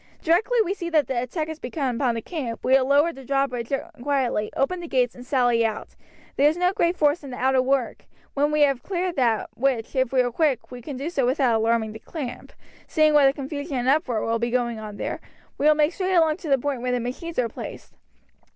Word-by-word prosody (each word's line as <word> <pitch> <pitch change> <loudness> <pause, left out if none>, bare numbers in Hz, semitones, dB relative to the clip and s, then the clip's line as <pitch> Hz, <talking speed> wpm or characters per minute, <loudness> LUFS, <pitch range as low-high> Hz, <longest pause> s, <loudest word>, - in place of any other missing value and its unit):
Directly 390 +9 +2
we 375 - -1
see 345 -4 -5
that 310 -4 +3
the 240 -1 -1
attack 305 +6 -3
has 315 -1 -7
begun 255 -1 -2
upon 245 -3 +1
the 230 - -4
camp 265 -10 -5
we 260 - +2
will 265 -1 +4
lower 290 +4 +3
the 270 - -11
drawbridge 260 -3 -1 0.3
quietly, 255 -6 0
open 350 +7 0
the 345 - -7
gates, 250 -5 +1
and 245 - -11
sally 245 -3 +2
out. 220 -1 -2 0.5
There 285 +2 +5
is 315 - -3
no 360 +1 +2
great 345 -1 +1
force 295 +1 +2
in 280 - -8
the 250 - -7
outer 260 0 +3
work. 260 -2 -1 0.3
When 290 +1 +1
we 300 0 +1
have 275 -4 +3
cleared 360 +1 -2
that 230 -4 +1
which, 250 -3 -1
if 260 -2 +1
we 260 -1 +4
are 245 -1 -1
quick, 270 -3 0
we 250 -1 -8
can 265 +2 -7
do 275 +4 -4 0.2
without 255 -1 +2
alarming 225 0 +1
the 220 - -9
camp, 275 -1 -7 0.4
seeing 310 -1 +3
what 290 -2 +6
a 270 - +3
confusion 285 +1 -5
and 245 0 -1
uproar 255 -6 +1
will 230 0 0
be 235 +1 -1
going 240 -2 -1
on 210 -1 -8
there - - -4 0.4
we 295 - +3
will 305 - +6
make 300 +2 +2
straight 375 0 -1
along 320 -2 +3
to 355 -5 -7
the 275 - +4
point 270 -1 -3
where 250 0 -1
the 250 - +1
machines 260 +8 -5
are 250 -2 +2
placed. 225 - -9
270 Hz, 235 wpm, -24 LUFS, 245-305 Hz, 0.5 s, what